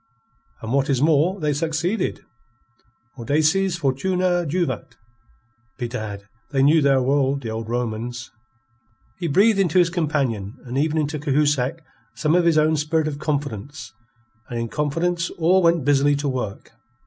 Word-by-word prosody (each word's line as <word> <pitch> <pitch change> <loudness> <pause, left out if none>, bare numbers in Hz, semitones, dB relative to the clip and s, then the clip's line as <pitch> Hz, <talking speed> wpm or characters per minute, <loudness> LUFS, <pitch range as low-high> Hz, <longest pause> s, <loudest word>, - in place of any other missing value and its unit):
"And 115 +2 -3
what 140 +1 +1
is 135 -3 +2
more, 160 +6 +2
they've 150 -3 0
succeeded. 165 +6 -2 0.9
Audaces 155 +9 +1
fortuna 175 +5 0
juvat. 150 -6 -2 0.8
Bedad, 110 -5 -5 0.2
they 135 -2 +1
knew 155 +3 +5
their 135 -2 +3
world, 140 +1 +1
the 115 - -4
old 110 0 -5
Romans." 120 0 -4 0.9
He 175 - -2
breathed 200 +7 +4
into 185 -3 +2
his 175 -1 +4
companions 140 - -1
and 125 +1 -6
even 155 +3 +1
into 150 0 -1
Cahusac 145 0 0 0.3
some 155 0 0
of 175 0 +3
his 165 -2 +3
own 155 +1 +3
spirit 155 +1 0
of 145 -2 -4
confidence, 145 -2 -4 0.6
and 120 - -3
in 115 0 -3
confidence 165 +5 -1
all 175 +3 +3
went 170 -4 +2
busily 145 0 +3
to 145 +1 -2
work. 125 -6 -4
145 Hz, 145 wpm, -22 LUFS, 130-165 Hz, 0.9 s, knew